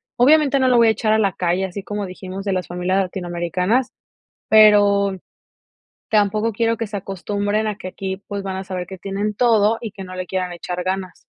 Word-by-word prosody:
obviamente, 280 +2 +4
no 260 - +3
lo 250 -1 +4
voy 230 -1 +6
a - - +5
echar 220 0 0
a 220 - +4
la 200 -3 +1
calle, 180 +2 0
así 190 +2 -6
como 205 +1 -4
dijimos 185 +1 -8
de 195 - 0
las 185 -2 -2
familias 180 +2 -1
latinoamericanas, 180 +5 -1 0.6
pero, 205 -2 +5 0.9
tampoco 215 +1 +1
quiero 230 +2 0
que 230 0 -3
se 205 0 -6
acostumbren 205 +2 -2
a 210 -2 -2
que 185 - -6
aquí, 190 +1 -5
pues, 200 -2 -4
van 190 - -3
a 190 - -4
saber 185 -2 -5
que 190 - -8
tienen 200 +2 -3
todo 225 -1 +3
y 230 -3 -5
que 195 -1 -9
no 185 0 -9
le 185 0 -5
quieran 185 0 -3
echar 175 +1 -5
ganas. 185 -2 -3
200 Hz, 205 wpm, -20 LUFS, 185-215 Hz, 0.9 s, voy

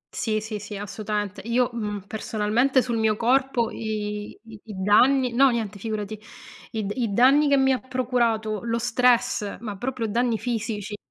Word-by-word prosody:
Sì, 215 -2 -1
sì, 215 -1 -5
sì, 205 0 -7
assolutamente. 205 0 -4
Io, 245 +2 +1
uhm, 210 -4 -4
personalmente 220 +5 +1
sul 240 -2 -2
mio 220 -1 +2
corpo 250 -1 +1
i 210 -1 -4
i 225 -2 -13
i 215 - -8
danni 245 +6 +4
no 270 +2 +5
niente, 215 -4 -3
figurati, 215 0 -4 0.5
i 220 -2 -2
d 200 - -3
i 235 -5 -1
danni 275 +7 +5
che 280 - +4
mi 265 0 +3
ha 255 - -1
procurato 235 -4 -1
lo 230 0 -1
stress, 240 -2 +1
ma 210 -3 -5
proprio 245 +2 -3
danni 235 +1 +1
fisici, 215 -4 -3
225 Hz, 170 wpm, -24 LUFS, 210-250 Hz, 0.5 s, no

